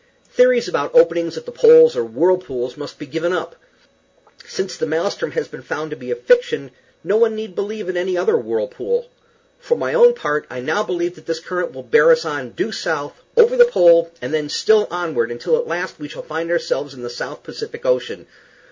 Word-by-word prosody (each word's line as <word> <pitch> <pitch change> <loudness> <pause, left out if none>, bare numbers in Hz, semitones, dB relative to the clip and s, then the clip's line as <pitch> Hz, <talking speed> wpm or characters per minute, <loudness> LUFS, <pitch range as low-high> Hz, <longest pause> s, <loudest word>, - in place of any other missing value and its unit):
Theories - - +4
about - - -3
openings 170 - +3
at 475 - -8
the 485 - -8
poles, 480 0 +7
or - - 0
whirlpools, 130 -1 -1
must 145 -1 -9
be 150 - -9
given 165 +5 -2
up. 165 -1 -4 0.9
Since - - -4
the 475 - -3
Maelstrom 485 - -2
has 470 - -2
been - - -12
found 155 0 -5
to - - -4
be - - -11
a 475 - -1
fiction, 485 0 +1 0.3
no 205 - +1
one 225 -1 +3
need 215 -3 -7
believe 210 +1 -5
in 185 - -3
any 180 +1 -1
other 445 - +2
whirlpool. 480 +1 -2 0.5
For 480 -1 -1
my - - -2
own 485 -1 +6
part, 150 - -2
I 130 - -7
now 130 +11 -1
believe 175 -4 -2
that 155 - -18
this 165 -1 -2
current 180 +1 -4
will - - -10
bear 465 +2 +4
us 485 0 +3
on, - - -5
due - - -3
south, - - -4 0.2
over 475 +1 +6
the 485 -1 +8
pole, 170 - +5
and - - -4
then 150 -1 -1
still 215 +6 +3
onward, 160 -10 -2
until 120 - -1
at 480 0 -2
last 180 -1 -4
we 150 - -7
shall - - -10
find 160 +2 -5
ourselves 145 -4 -2
in 125 - -11
the - - -5
South 120 - -7
Pacific 465 +2 -9
Ocean. - - -1
185 Hz, 210 wpm, -19 LUFS, -, 0.9 s, the